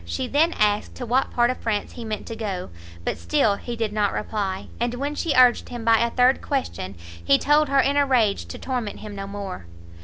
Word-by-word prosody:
She 85 0 -3
then 320 +4 +2
asked 210 0 +1
to 250 - -5
what 255 +3 +1
part 240 0 +2
of 255 - -6
France 215 -3 -2
he 240 - -8
meant 215 -2 -4
to 225 - -6
go; 195 - -4 0.3
but - - -2
still 140 - +2
he 240 - -6
did 225 -2 -2
not 210 -2 +1
reply; 195 -3 -3
and 240 +1 -1
when 280 +3 -2
she 300 0 -1
urged 250 -1 +5
him 240 -2 -6
by 225 -1 +5
a 235 - +2
third 250 +2 +3
question, 255 - -3 0.3
he 140 +11 +5
told 295 0 +3
her 275 0 +3
in 280 +1 +2
a 285 - +4
rage 225 -7 +2
to - - -7
torment 245 -5 -4
him 215 -1 -8
no 195 0 -5
more. 195 - -6
230 Hz, 225 wpm, -24 LUFS, 205-255 Hz, 0.3 s, urged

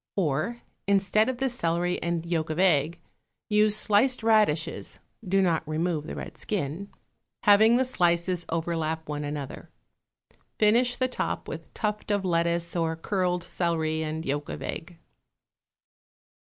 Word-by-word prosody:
Or, 185 - -1 0.2
instead 200 +3 +3
of 260 - -3
the 265 +2 0
celery 175 -7 -1
and 170 -1 -2
yolk 165 -2 -1
of 155 - -3
egg, 170 -3 +2 0.5
use 210 0 +4
sliced 220 +4 +2
radishes 210 -9 +1 0.3
(do 195 0 +2
not 170 -3 +2
remove 160 -1 -1
the - - -5
red - - -8
skin), 190 0 -3 0.5
having 215 +2 +6
the 260 +1 +3
slices 175 -5 +1
overlap 160 -1 -2
one 150 0 -3
another. 145 -2 -6 0.9
Finish 240 +4 +3
the 255 - +1
top 250 - -3
with - - -8
tuft 210 -1 -3
of 205 -2 0
lettuce 170 0 0
or 165 -1 0
curled 180 0 -1
celery 160 -2 -1
and 160 +1 -4
yolk 145 +2 -2
of - - -6
egg. 165 +1 -6
175 Hz, 140 wpm, -27 LUFS, 160-210 Hz, 0.9 s, having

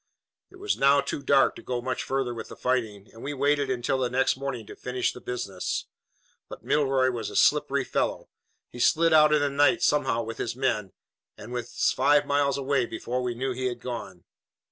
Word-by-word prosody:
"It 380 - -17
was 405 +2 -2
now 140 +1 +5
too 140 +1 -3
dark 140 -1 +3
to - - -10
go 125 -1 -3
much 130 +1 -3
further 135 -2 -2
with 115 - -7
the - - -10
fighting, 110 -6 -2
and 115 - -13
we 145 +1 -4
waited 140 0 +1
until 130 +1 -1
the 125 -1 0
next 130 +1 +2
morning 135 -4 -5
to - - -11
finish 125 0 -2
the 125 - -11
business. 100 -7 -4 0.6
But - - -10
Milroy 135 -3 +2
was 115 -4 -4
a - - -10
slippery 145 -2 +3
fellow. - - -2 0.4
He 120 - -10
slid 165 +5 +3
out 155 -1 +6
in 150 -1 +3
the 145 - +1
night 145 +5 +3
somehow 135 -7 +2
with 115 0 -7
his 115 - -3
men, 110 -8 -1 0.4
and 115 +4 -9
was 120 -1 0
five 145 +2 +3
miles 140 -1 +1
away 135 -2 0
before 125 +2 -3
we 125 -1 -2
knew 130 +2 -2
he 130 +1 -4
had 120 -1 -4
gone. 115 -8 -7
130 Hz, 205 wpm, -26 LUFS, 120-140 Hz, 0.6 s, out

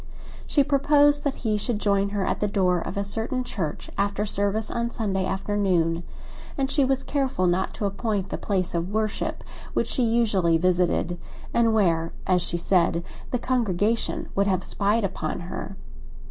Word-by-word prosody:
She 285 - +4
proposed 290 +1 +4
that 280 - 0
he 215 -1 +1
should 225 +1 0
join 200 -1 +1
her 200 -2 -1
at - - -1
the 210 - +1
door 185 -3 +2
of 180 +3 -5
a 200 - +1
certain 225 +5 -2
church, 170 -11 -4
after 200 +1 0
service 205 +1 -1
on 235 0 -1
Sunday 195 -5 -1
afternoon, 190 -4 0 0.6
and 270 -1 0
she 285 - +4
was 270 0 +1
careful 265 -10 0
not 180 +2 +1
to 210 - -2
appoint 200 -1 -2
the - - -3
place 185 -3 0
of 170 +1 -1
worship 215 0 -2 0.3
which - - +1
she 260 - 0
usually 215 -8 +3
visited, 175 0 +1 0.3
and 230 -1 +3
where, 165 -5 +2
as 180 -1 +3
she 175 0 -1
said, 170 -1 +2 0.3
the 250 - 0
congregation 230 -3 0
would 200 +1 +1
have 185 -2 +1
spied 210 +2 +1
upon 175 -4 -3
her. 175 +2 -6
200 Hz, 170 wpm, -25 LUFS, 180-230 Hz, 0.6 s, She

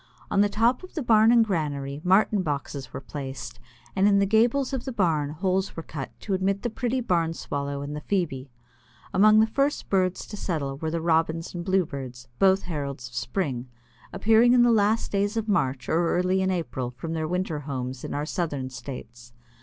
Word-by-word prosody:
On 200 - +4
the 205 - +3
top 230 +4 +2
of 370 - -12
the 310 - -2
barn 220 -1 +5
and 235 -2 +5
granary 145 -7 -2
Martin 195 +2 +3
boxes 140 -4 -4
were - - -5
placed, 135 -2 -7 0.4
and 195 +1 +4
in 200 -1 +5
the 200 - +4
gables 235 +6 +2
of 260 -3 -2
the 265 - -3
barn 165 - +1
holes 185 +5 -1
were 165 - -5
cut 140 -5 -6
to 200 - -3
admit 195 +1 0
the 240 - -1
pretty 245 +3 -1
Barn 170 -7 0
Swallow 140 -1 -4
and 145 +1 -5
the 150 - -5
Phoebe. 145 -10 -2 0.6
Among 215 +2 +6
the 220 - +6
first 275 +6 -1
birds 185 -2 +1
to 210 - -8
settle 150 -9 -3
were 160 +2 -3
the 165 +1 -2
Robins 165 0 +1
and 175 -1 -4
Bluebirds, 140 -10 -2
both 190 0 +4
heralds 140 -7 -5
of - - -21
spring, 130 -10 -2 0.4
appearing 225 +5 +4
in 245 -1 +6
the 240 - +5
last 220 0 +2
days 205 +2 0
of 225 -1 -1
March 135 -11 0
or 170 +1 +1
early 185 +1 +2
in 190 - +1
April 160 -9 -2
from 125 +7 -6
their 160 -1 -2
winter 180 -2 -2
homes 130 -3 -5
in - - -4
our 145 +1 -1
Southern 145 -6 -3
States. 120 -2 -9
175 Hz, 200 wpm, -26 LUFS, 140-205 Hz, 0.6 s, Among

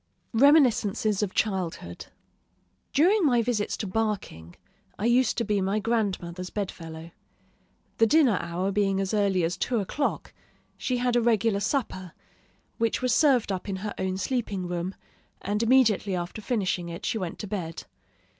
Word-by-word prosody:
REMINISCENCES 225 -6 +4
OF 205 -3 -2
CHILDHOOD 180 - -2 0.8
During 370 +8 +4
my 245 -6 +3
visits 220 -3 -1
to - - -4
Barking, 190 - -3 0.4
I 210 - -3
used 245 +2 +3
to 235 - +1
be 205 -2 0
my 195 +2 0
grandmother's 190 -5 -2
bedfellow. 165 -5 -6 0.9
The 225 - +6
dinner 275 -7 +4
hour 175 +3 -2
being 195 -1 +1
as 195 +1 -2
early 200 -4 +2
as 170 +3 -1
two 240 +6 -1
o'clock, 280 +9 -2 0.4
she 255 - -2
had 245 0 0
a 240 - +4
regular 225 -3 +2
supper, 195 - -2 0.7
which 230 +2 0
was 250 -2 +2
served 260 -7 +3
up 190 +1 -4
in 195 - -2
her 210 - -3
own 190 0 -1
sleeping 200 -4 -2
room; 175 +2 -3 0.4
and 205 +2 -2
immediately 225 -5 +3
after 175 +4 -5
finishing 190 -6 -1
it, 170 +1 -7
she 220 - -1
went 180 -4 -4
to - - -6
bed. 180 -6 -5
205 Hz, 155 wpm, -26 LUFS, 185-235 Hz, 0.9 s, The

